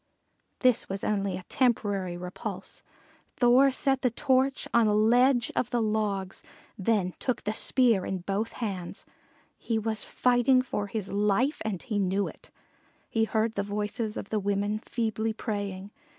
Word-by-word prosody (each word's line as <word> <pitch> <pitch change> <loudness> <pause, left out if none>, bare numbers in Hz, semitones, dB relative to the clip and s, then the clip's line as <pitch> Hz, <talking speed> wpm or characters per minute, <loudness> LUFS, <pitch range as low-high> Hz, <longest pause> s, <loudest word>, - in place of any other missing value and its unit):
This 255 -3 +3
was 195 0 -2
only 200 -3 -1
a 185 - -9
temporary 200 -7 0
repulse. 180 +1 -6 0.6
Thor 250 +3 +5
set 270 0 +1
the 250 - +2
torch 265 +2 +1
on 235 -2 +5
a 210 - +2
ledge 245 +3 +3
of 245 - 0
the 240 - 0
logs, 210 -4 -1 0.3
then 195 -3 0
took 250 - -2
the 210 - -1
spear 230 -4 +4
in 190 -2 -3
both 200 +5 -2
hands. 195 -7 -5 0.5
He 230 - -1
was 220 -1 -2
fighting 250 +1 +3
for 205 -5 -3
his 200 -2 -5
life, 210 +8 +1
and 205 -5 -3
he 215 -5 -2
knew 195 +1 0
it. - - -12 0.6
He 225 -1 +2
heard 220 0 0
the 200 - -1
voices 210 +2 -3
of - - -6
the 215 - 0
women 205 +1 -1
feebly 220 -1 -2
praying. 205 -3 -4
215 Hz, 155 wpm, -28 LUFS, 200-240 Hz, 0.6 s, Thor